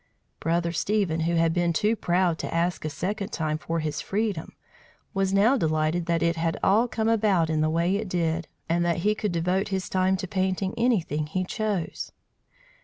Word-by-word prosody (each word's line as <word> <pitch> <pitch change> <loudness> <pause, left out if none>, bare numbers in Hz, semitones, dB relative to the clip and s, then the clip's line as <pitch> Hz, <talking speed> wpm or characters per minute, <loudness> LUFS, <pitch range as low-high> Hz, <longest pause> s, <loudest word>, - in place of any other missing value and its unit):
Brother 170 +1 0
Stephen, 180 -1 0
who 170 +1 +1
had 165 -1 +3
been 175 -1 +1
too 210 +7 +2
proud 175 -4 +1
to - - -4
ask 170 +1 0
a 155 - -2
second 200 +6 -3
time 155 -1 -1
for 165 -1 -2
his 150 -1 -2
freedom, 200 -5 -2 0.6
was 195 -1 +1
now 210 +7 +4
delighted 160 -1 0
that 170 -1 +1
it 170 0 +1
had 165 0 0
all 220 +5 +4
come 220 -2 -1
about 205 -8 +2
in 155 -1 +1
the 155 - +2
way 170 +4 +1
it 210 -2 -4
did, 165 -2 -1 0.2
and 170 +1 +1
that 170 -1 +1
he 210 - +4
could 210 -2 -2
devote 180 +4 0
his 190 -2 -2
time 185 0 +2
to 185 - -4
painting 190 0 -1
anything 180 -11 +1
he 185 +4 -1
chose. 205 -4 -3
175 Hz, 190 wpm, -26 LUFS, 165-195 Hz, 0.6 s, now